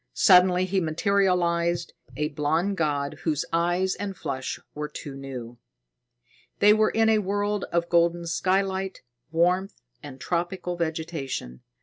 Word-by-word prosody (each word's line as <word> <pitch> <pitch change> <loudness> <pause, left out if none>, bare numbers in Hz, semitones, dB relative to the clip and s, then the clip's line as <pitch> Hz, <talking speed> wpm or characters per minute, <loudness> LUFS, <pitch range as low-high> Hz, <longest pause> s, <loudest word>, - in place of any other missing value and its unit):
Suddenly 180 -1 +5
he 190 0 0
materialized, 170 -1 +1 0.2
a 150 0 0
blond 160 +7 0
god, 145 -4 -1
whose 155 -4 -1
eyes 175 +3 +1
and 195 -2 -5
flesh 130 -1 -4
were 150 0 -4
too 145 -1 -8
new. 125 -3 -8 1.0
They 210 +1 +6
were 215 0 +3
in 225 0 +2
a 220 -1 +4
world 205 +1 -1
of 170 0 +1
golden 170 0 +2
skylight, 190 +3 -1 0.3
warmth 180 +4 +1 0.2
and 135 -3 -10
tropical 175 +3 -2
vegetation. 160 - -4
170 Hz, 125 wpm, -26 LUFS, 150-190 Hz, 1.0 s, They